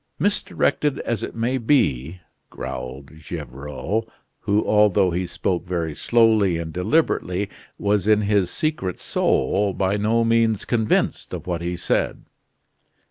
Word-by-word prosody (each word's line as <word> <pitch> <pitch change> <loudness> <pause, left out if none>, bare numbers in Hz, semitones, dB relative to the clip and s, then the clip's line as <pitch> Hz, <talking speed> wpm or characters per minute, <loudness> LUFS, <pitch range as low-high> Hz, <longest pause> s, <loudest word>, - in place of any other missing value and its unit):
"Misdirected 150 -5 0
as 115 -3 -2
it - - -5
may 120 +3 0
be," 90 - +1 0.3
growled 65 +3 -7
Gevrol, 80 - -4 0.3
who, 105 +1 +1
although 105 -3 +4
he 90 +1 -2
spoke 90 0 -2
very 85 -3 -2
slowly 110 -4 +3
and 80 -1 -5
deliberately, 95 - 0 0.3
was 105 -1 +1
in 105 -1 +5
his 100 -3 +2
secret 155 - -2
soul 100 -1 +1
by 95 +2 0
no 110 +3 +2
means 115 -2 +2
convinced 110 -3 0
of - - -8
what 85 -2 -2
he 90 +1 -3
said. - - -1
100 Hz, 130 wpm, -22 LUFS, 90-115 Hz, 0.3 s, in